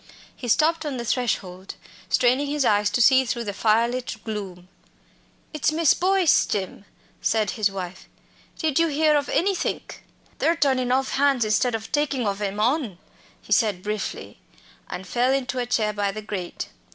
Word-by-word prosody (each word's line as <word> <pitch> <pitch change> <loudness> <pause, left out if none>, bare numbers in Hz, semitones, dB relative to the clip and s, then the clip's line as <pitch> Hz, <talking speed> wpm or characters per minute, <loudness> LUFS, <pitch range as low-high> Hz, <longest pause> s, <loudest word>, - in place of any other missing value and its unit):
He 250 - -7
stopped 315 +7 +2
on 290 -4 -3
the 235 - -4
threshold, 195 -6 -2 0.3
straining 255 +4 +2
his 290 -1 0
eyes 205 -1 +3
to 245 - 0
see 265 +2 +6
through 235 -1 -3
the 205 -2 -4
fire 220 +3 +3
lit 250 +1 -4
gloom. 195 -5 -6 0.9
"It's 305 0 +1
Miss 320 -1 +4
Boyce, 370 -2 +3
Jim," 195 0 -4 0.4
said 220 -2 +1
his 215 -3 +1
wife. 190 -2 -7 0.5
"Did 315 -2 0
you 335 - +4
hear 305 0 +2
of 285 -1 0
anythink?" 385 +1 -1 0.4
"They're 335 - +2
turnin' 260 -5 +1
off 265 +1 +1
hands 275 -4 +2
instead 225 +3 +1
of 220 0 -6
takin' 285 -4 0
ov 200 0 -2
'em 205 0 -2
on," 240 - 0 0.5
he - - 0
said 205 -6 +1
briefly, 210 -1 -5 0.5
and 185 - -6
fell 245 +5 +1
into 260 -1 -1
a 245 - -2
chair 215 -3 +1
by 200 -1 -1
the 215 +2 -7
grate. 190 -4 -5
240 Hz, 170 wpm, -24 LUFS, 210-280 Hz, 0.9 s, see